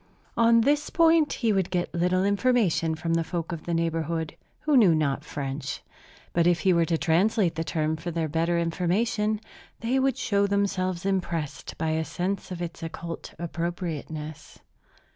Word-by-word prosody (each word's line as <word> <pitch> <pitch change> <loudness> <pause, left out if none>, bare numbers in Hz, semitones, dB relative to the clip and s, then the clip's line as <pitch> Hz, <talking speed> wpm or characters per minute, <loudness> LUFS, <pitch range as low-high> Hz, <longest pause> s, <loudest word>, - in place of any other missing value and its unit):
On 230 0 +5
this 295 +5 +2
point 330 -2 +4
he 230 -4 +1
would 190 -3 +1
get 180 -1 -2
little 180 +2 +2
information 200 -6 +2
from 165 +1 -2
the 165 0 +2
folk 170 +1 -4
of 165 -2 -6
the 170 - -2
neighborhood, 165 -1 -1 0.3
who 300 -1 +2
knew 200 -10 +6
not 145 -2 0
French. 140 -1 -5 0.5
But 170 0 +3
if 175 -1 +3
he 190 - +4
were 170 -1 +3
to 165 0 0
translate 180 +3 +2
the 165 +1 -2
term 155 -1 -1
for 175 - -5
their 165 -1 -1
better 165 +3 0
information, 205 +6 0 0.4
they 245 +3 +1
would 265 -1 +1
show 200 -5 +1
themselves 190 -3 0
impressed 170 -6 -2
by 160 0 -1
a 160 0 0
sense 185 +4 -3
of 175 -1 -4
its 170 0 -6
occult 165 0 -7
appropriateness. 165 -3 -5
175 Hz, 165 wpm, -26 LUFS, 160-200 Hz, 0.5 s, knew